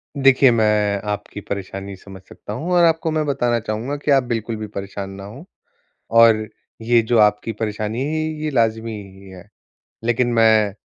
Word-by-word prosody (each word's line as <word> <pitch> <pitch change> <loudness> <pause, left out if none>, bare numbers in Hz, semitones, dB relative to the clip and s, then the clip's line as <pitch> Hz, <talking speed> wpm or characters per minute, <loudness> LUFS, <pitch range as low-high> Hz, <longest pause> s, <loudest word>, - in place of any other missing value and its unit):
देखिए, 135 -2 +5
मैं 105 -3 +1
आपकी 105 0 -5
परेशानी 100 0 -6
समझ 95 0 -13
सकता 105 - -9
हूँ 170 +10 -4
और 175 -1 +5
आपको 160 -1 +2
मैं 155 -1 0
बताना 120 -4 0
चाहूँगा 115 +6 -4
कि 145 0 -1
आप 135 -2 +4
बिल्कुल 115 -1 -3
भी 110 0 -6
परेशान 100 -1 -6
ना 100 - -9
हो। 125 - -11 0.7
और 110 -2 +5 0.3
ये 115 +1 +3
जो 115 +1 0
आपकी 105 +1 +2
परेशानी 110 +2 -3
है, 145 +3 -2
ये 155 -1 -3
ये 155 - -1
लाज़मी 115 -2 0
ही 100 -2 -10
है। 95 +2 -13 0.6
लेकिन 120 +1 +1
मैं 110 -3 +4
110 Hz, 175 wpm, -20 LUFS, 105-130 Hz, 0.7 s, देखिए